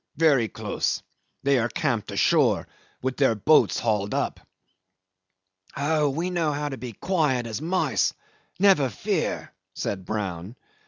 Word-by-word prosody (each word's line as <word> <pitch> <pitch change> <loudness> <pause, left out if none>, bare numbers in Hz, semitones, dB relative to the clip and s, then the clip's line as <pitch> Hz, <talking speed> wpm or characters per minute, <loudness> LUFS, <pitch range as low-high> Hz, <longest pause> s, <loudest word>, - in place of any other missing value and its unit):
Very 145 -8 +4
close. - - -2 0.4
They 140 -2 +3
are 115 +1 0
camped 125 -9 -1
ashore - - +3 0.4
with 130 0 -2
their 135 -5 +3
boats 150 +9 +4
hauled 105 -3 0
up." - - -1 1.4
"Oh, 150 +1 +2
we 165 +6 -2
know 165 -4 +1
how 145 +1 -2
to 135 - -5
be 125 - -5
as 115 - -11
quiet 150 -10 +1
as 115 +3 -4
mice; 180 +4 +1 0.4
never 185 -9 +5
fear," 105 - -2 0.2
said 95 -2 -3
Brown. 95 0 -4
135 Hz, 140 wpm, -25 LUFS, 110-155 Hz, 1.4 s, never